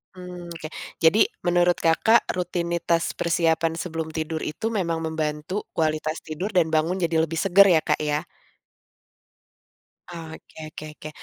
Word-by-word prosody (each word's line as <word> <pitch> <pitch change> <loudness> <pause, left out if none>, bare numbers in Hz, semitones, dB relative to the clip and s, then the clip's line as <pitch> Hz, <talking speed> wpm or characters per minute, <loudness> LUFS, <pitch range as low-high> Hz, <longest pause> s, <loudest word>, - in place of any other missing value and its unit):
Mmm, 180 -1 -9
oke. 160 -2 -7 0.3
Jadi 175 +7 +5 0.2
menurut 175 0 +3
Kakak, 220 +8 +3
rutinitas 170 -1 -1
persiapan 165 -1 +1
sebelum 160 -2 -4
tidur 160 0 -3
itu 160 +9 -3
memang 180 -7 -1
membantu 160 +3 -3
kualitas 155 0 -1
tidur 175 +7 -5
dan 180 -5 +3
bangun 160 +4 +1
jadi 170 -2 0
lebih 165 0 -2
segar 195 +1 +6
ya, 160 - +5
Kak, - - 0
ya? 150 0 0 1.9
Oh, 170 -2 -7
oke - - -15
oke 155 - -9
oke, 155 - -8
165 Hz, 140 wpm, -24 LUFS, 160-175 Hz, 1.9 s, segar